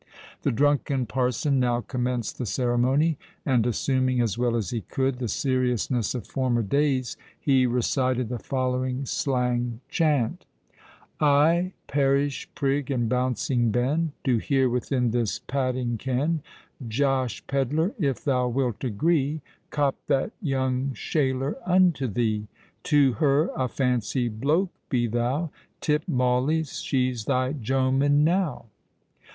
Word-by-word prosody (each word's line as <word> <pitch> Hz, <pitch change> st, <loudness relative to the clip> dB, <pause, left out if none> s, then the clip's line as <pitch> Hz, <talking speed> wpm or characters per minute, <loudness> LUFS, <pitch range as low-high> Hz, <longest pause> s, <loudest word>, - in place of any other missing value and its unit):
The -, -, +1 dB
drunken 140 Hz, 0 st, +1 dB
parson 130 Hz, +3 st, 0 dB
now 120 Hz, -1 st, +1 dB
commenced 125 Hz, -3 st, -3 dB
the 125 Hz, -, -2 dB
ceremony; 130 Hz, +7 st, +1 dB, 0.3 s
and 125 Hz, -4 st, +2 dB
assuming, 130 Hz, +1 st, +1 dB
as 115 Hz, -5 st, +1 dB
well 120 Hz, -1 st, 0 dB
as 110 Hz, -7 st, -2 dB
he 115 Hz, -, -2 dB
could, 130 Hz, +6 st, -1 dB
the 125 Hz, -, -2 dB
seriousness 125 Hz, 0 st, 0 dB
of 125 Hz, -, -4 dB
former 125 Hz, -3 st, 0 dB
days, 135 Hz, +2 st, 0 dB, 0.2 s
he 130 Hz, -3 st, +3 dB
recited 125 Hz, 0 st, 0 dB
the 120 Hz, +1 st, -4 dB
following 130 Hz, +1 st, -1 dB
slang 125 Hz, -3 st, -1 dB
chant:— 145 Hz, -8 st, +1 dB, 0.8 s
"I, 160 Hz, +5 st, +3 dB
parish 140 Hz, 0 st, 0 dB
prig 140 Hz, 0 st, 0 dB
and 120 Hz, -4 st, 0 dB
bouncing 125 Hz, 0 st, +1 dB
ben, 140 Hz, +8 st, 0 dB
Do 125 Hz, -3 st, +2 dB
here, 135 Hz, +2 st, +2 dB
within 125 Hz, 0 st, 0 dB
this 115 Hz, -3 st, 0 dB
padding 130 Hz, -3 st, -2 dB
ken, 140 Hz, +6 st, 0 dB, 0.5 s
Josh 130 Hz, -1 st, 0 dB
Pedler—if 140 Hz, -, 0 dB
thou 125 Hz, -3 st, +1 dB
wilt 125 Hz, -2 st, -1 dB
agree— 145 Hz, +5 st, +1 dB, 0.3 s
Cop 145 Hz, -2 st, +1 dB
that 140 Hz, +8 st, +1 dB
young 130 Hz, -, -1 dB
shaler 135 Hz, +2 st, -1 dB
unto 180 Hz, -7 st, +3 dB
thee. 110 Hz, -1 st, -1 dB, 0.4 s
To 145 Hz, -4 st, +4 dB
her 145 Hz, +3 st, +3 dB
a 130 Hz, -, 0 dB
fancy 125 Hz, -1 st, 0 dB
bloak 150 Hz, -, 0 dB, 0.2 s
be 120 Hz, -3 st, +1 dB
thou:— 125 Hz, +8 st, -1 dB, 0.3 s
Tip 150 Hz, 0 st, 0 dB
mauleys—she's 125 Hz, -2 st, 0 dB
thy 130 Hz, +1 st, +1 dB
jomen 135 Hz, +3 st, +2 dB
now." 170 Hz, -5 st, 0 dB
130 Hz, 125 wpm, -25 LUFS, 125-140 Hz, 0.8 s, To